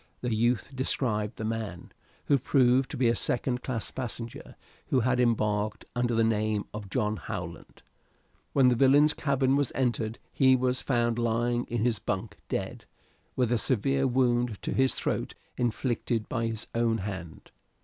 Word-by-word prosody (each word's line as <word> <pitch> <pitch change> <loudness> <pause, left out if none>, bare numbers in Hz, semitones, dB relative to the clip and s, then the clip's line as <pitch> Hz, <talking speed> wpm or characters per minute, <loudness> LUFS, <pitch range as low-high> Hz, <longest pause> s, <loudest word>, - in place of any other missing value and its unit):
The 120 -2 -1
youth 120 +4 0
described 115 -5 -1
the 110 - -5
man, 110 -5 -4 0.3
who 140 - +3
proved 130 0 +3
to - - -5
be 125 -1 +3
a 115 - +4
second 125 +2 -1
class 120 -4 -3
passenger, 120 -2 -6 0.3
who 130 - +2
had 125 +2 +1
embarked 105 -3 +1
under 120 -1 +1
the 115 - +3
name 110 -2 0
of 105 -2 -7
John 105 0 0
Howland. 85 -4 -7 0.7
When 130 -2 +5
the 125 - +3
villain's 140 +4 +5
cabin 135 -2 +1
was 140 -3 +1
entered 120 -4 0 0.2
he 130 -1 +5
was 130 0 +1
found 120 -3 +1
lying 120 +1 0
in 120 -1 -1
his 115 -5 +1
bunk - - -3
dead, - - -4 0.5
with 125 -3 +1
a 120 - +2
severe 135 +4 +2
wound 120 -3 +1
in - - -1
his 130 0 +2
throat - - -2 0.2
inflicted 120 -2 -1
by 115 -2 -1
his 110 -1 -3
own 115 -1 +1
hand. 90 -5 -7
120 Hz, 160 wpm, -28 LUFS, 110-130 Hz, 0.7 s, When